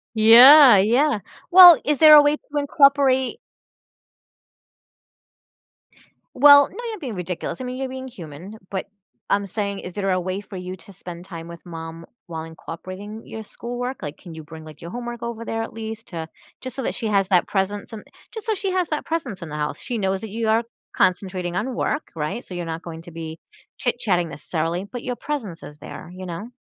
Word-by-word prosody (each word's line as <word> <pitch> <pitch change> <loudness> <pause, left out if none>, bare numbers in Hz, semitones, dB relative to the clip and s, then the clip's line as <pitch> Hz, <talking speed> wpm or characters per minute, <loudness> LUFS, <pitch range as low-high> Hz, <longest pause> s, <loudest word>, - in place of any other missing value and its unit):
Yeah, 245 +3 +9
yeah. 240 +5 +3 0.3
Well, 355 -3 +10
is 295 -1 +1
there 310 -1 +9
a 295 - +9
way 295 +1 +2
to 290 +1 -8
incorporate 280 - +3 3.0
Well, 285 +1 +8
now - - -17
you're 435 -4 -6
being 250 - -6
ridiculous. 180 +7 -5
I - - -4
mean, 250 0 -5
you're 265 -1 -3
being 260 0 -7
human. 180 - -10
But 190 -2 -4 0.4
I'm 200 0 +1
saying, 200 0 -3
is 180 - -8
there 195 -2 -2
a 185 - +1
way 185 +2 -4
for 200 -1 -12
you 180 +1 -6
to 200 +1 -13
spend 175 -1 -10
time 165 -3 -9
with 170 0 -12
mom 165 -1 -8 0.2
while 160 -2 -6
incorporating 185 +6 -9
your 220 0 -8
schoolwork? 245 +4 -6
Like, 150 -1 -6
can 175 - -12
you 160 -1 -9
bring, 160 +1 -11
like, 155 -2 -13
your 170 - -8
homework 240 -1 -6
over 235 -1 -5
there 225 - -3
at - - -8
least 225 0 -7
to 165 -2 -6 0.3
just 255 -2 -7
so 270 - -4
that - - -2
she 225 - -3
has 200 -2 +1
that 180 -3 +3
presence 200 +2 -2
and 210 - -8 0.3
just 445 -1 -8
so 445 - +1
she 390 -2 -3
has 365 -3 0
that 305 - -3
presence 265 - -4
in 165 - -7
the 150 - -6
house. 150 0 -3
She 245 -3 -4
knows 195 -1 -1
that 220 - -7
you 225 +2 -3
are 225 +2 +2 0.3
concentrating 180 -1 0
on 245 +5 -2
work. 295 - -2
Right? 155 +10 -4
So, - - -11
you're 175 -1 -4
not 165 +1 -5
going 165 -1 -8
to 170 - -12
be 160 0 -8 0.4
chitchatting 190 -9 0
necessarily, 165 +4 -3
but 240 +3 -8
your 250 -1 -3
presence 235 - -5
is 150 - -11
there, 165 - -10
you 185 - -8
know? 185 +6 -7
205 Hz, 205 wpm, -22 LUFS, 175-255 Hz, 3.0 s, Well